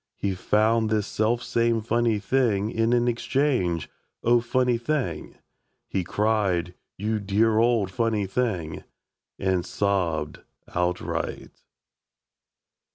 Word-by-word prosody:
He 100 Hz, -1 st, -1 dB
found 110 Hz, +4 st, +2 dB
this 105 Hz, -2 st, +1 dB
selfsame 115 Hz, +1 st, 0 dB
funny 115 Hz, 0 st, +1 dB
thing 110 Hz, -1 st, +1 dB
In 115 Hz, +1 st, +1 dB
an 120 Hz, 0 st, +3 dB
exchange 120 Hz, -, 0 dB, 0.4 s
"O, 120 Hz, +1 st, +5 dB
funny 120 Hz, 0 st, +1 dB
thing!" 120 Hz, -, -2 dB, 0.5 s
He 95 Hz, -, -1 dB
cried, 100 Hz, -4 st, 0 dB, 0.2 s
"You 110 Hz, +2 st, -1 dB
dear 110 Hz, +2 st, +2 dB
old 115 Hz, -5 st, +2 dB
funny 115 Hz, -3 st, 0 dB
thing!" 95 Hz, -7 st, -2 dB, 0.5 s
And 95 Hz, -2 st, 0 dB
Sobbed 85 Hz, -8 st, -1 dB, 0.3 s
Outright. 90 Hz, 0 st, -2 dB
110 Hz, 100 wpm, -25 LUFS, 95-120 Hz, 0.5 s, O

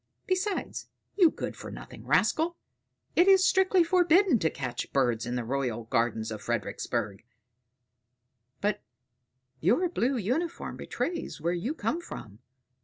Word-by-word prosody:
Besides, 375 Hz, +2 st, -2 dB, 0.3 s
you 360 Hz, -5 st, +6 dB
good -, -, -5 dB
for -, -, -8 dB
nothing -, -, -10 dB
rascal, 330 Hz, +2 st, +2 dB, 0.6 s
it 350 Hz, -, +5 dB
is 385 Hz, -1 st, +7 dB
strictly 380 Hz, -2 st, +4 dB
forbidden 350 Hz, -, +4 dB
to 160 Hz, -, +2 dB
catch 125 Hz, -5 st, -5 dB
birds 120 Hz, -4 st, +1 dB
in 120 Hz, -, -2 dB
the 125 Hz, -, -1 dB
royal 120 Hz, -2 st, -2 dB
gardens 115 Hz, -2 st, 0 dB
of 110 Hz, -, -5 dB
Fredericksburg; 100 Hz, +1 st, -2 dB, 1.4 s
but 205 Hz, 0 st, 0 dB, 0.8 s
your 240 Hz, -, +3 dB
blue 265 Hz, -5 st, 0 dB
uniform 265 Hz, -, -2 dB
betrays 340 Hz, -, -4 dB
where 170 Hz, +3 st, 0 dB
you 225 Hz, -, -2 dB
come 335 Hz, +1 st, -1 dB
from." 110 Hz, -, -9 dB
225 Hz, 130 wpm, -28 LUFS, -, 1.4 s, is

